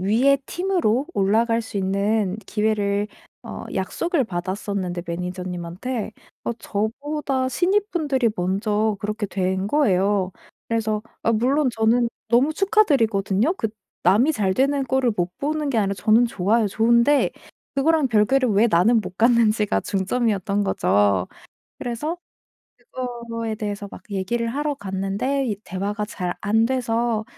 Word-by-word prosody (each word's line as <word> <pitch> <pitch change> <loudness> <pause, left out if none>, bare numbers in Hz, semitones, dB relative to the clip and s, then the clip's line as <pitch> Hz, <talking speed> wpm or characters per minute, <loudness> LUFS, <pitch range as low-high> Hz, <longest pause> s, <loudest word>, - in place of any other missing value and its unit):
위에 240 +9 +3
팀으로 340 - 0
올라갈 230 - +2
수 225 -1 -7
있는 200 +1 0
기회를 210 -1 0 0.3
어 - - -7
약속을 335 -6 0
받았었는데 185 -1 -3
매니저님한테 180 +6 -4 0.3
어 - - -1
저보다 260 +5 -2
신입분들이 340 - +1
먼저 205 +4 0
그렇게 210 0 -2
된 190 0 -1
거예요. 200 -7 +2 0.4
그래서 220 -2 0 0.2
아 230 - +2
물론 260 +6 +2
저는 230 +2 +2 0.2
너무 250 +7 +3
축하드리거든요. 270 - +2
그 225 - -2 0.4
남이 215 - +4
잘 195 -8 0
되는 275 +3 +2
꼴을 260 -2 +1
못 175 0 -2
보는 300 +1 -1
게 240 - +1
아니라 200 -2 +1
저는 220 +4 +4
좋아요 215 +1 +1
좋은데 235 +7 +3 0.4
그거랑 305 +1 +3
별개로 245 +4 +3
왜 210 +3 +4
나는 215 +6 +4
못 185 -2 -8
갔는지가 225 -3 +3
중점이었던 200 0 0
거죠. 100 - +2 0.5
그래서 270 +8 -3 0.8
그거에 235 -3 -4
대해서 205 -1 -4
막 - - -11
얘기를 205 +5 -1
하러 290 +4 -1
갔는데 200 +6 -2
이 210 -4 -1
대화가 200 +3 -3
잘 180 -4 -4
안돼서 230 +1 +1
220 Hz, 295 characters per minute, -23 LUFS, 200-255 Hz, 0.8 s, 남이